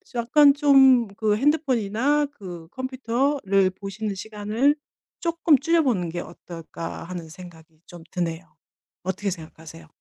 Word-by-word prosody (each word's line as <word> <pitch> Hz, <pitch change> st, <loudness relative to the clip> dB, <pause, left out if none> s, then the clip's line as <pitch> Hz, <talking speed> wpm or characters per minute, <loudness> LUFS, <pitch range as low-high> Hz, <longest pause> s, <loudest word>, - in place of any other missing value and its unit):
약간 280 Hz, +5 st, +5 dB
좀 270 Hz, -5 st, +5 dB
그 215 Hz, -1 st, +1 dB
'핸드폰이나 275 Hz, 0 st, +1 dB
그 180 Hz, -, -10 dB
컴퓨터를 260 Hz, -6 st, 0 dB
보시는 200 Hz, +2 st, -5 dB
시간을 220 Hz, +7 st, 0 dB, 0.5 s
쪼끔 335 Hz, -3 st, +3 dB
줄여 330 Hz, +3 st, +2 dB
보는 195 Hz, -, 0 dB
게 175 Hz, +2 st, -4 dB
어떨까?' 165 Hz, -1 st, -8 dB
하는 175 Hz, -1 st, -7 dB
생각이 160 Hz, -2 st, -14 dB
좀 175 Hz, -2 st, -12 dB
드네요. 170 Hz, -1 st, -3 dB, 0.6 s
어떻게 190 Hz, +2 st, -2 dB
생각하세요? 160 Hz, -1 st, -10 dB
210 Hz, 280 characters per minute, -24 LUFS, 175-270 Hz, 0.6 s, 약간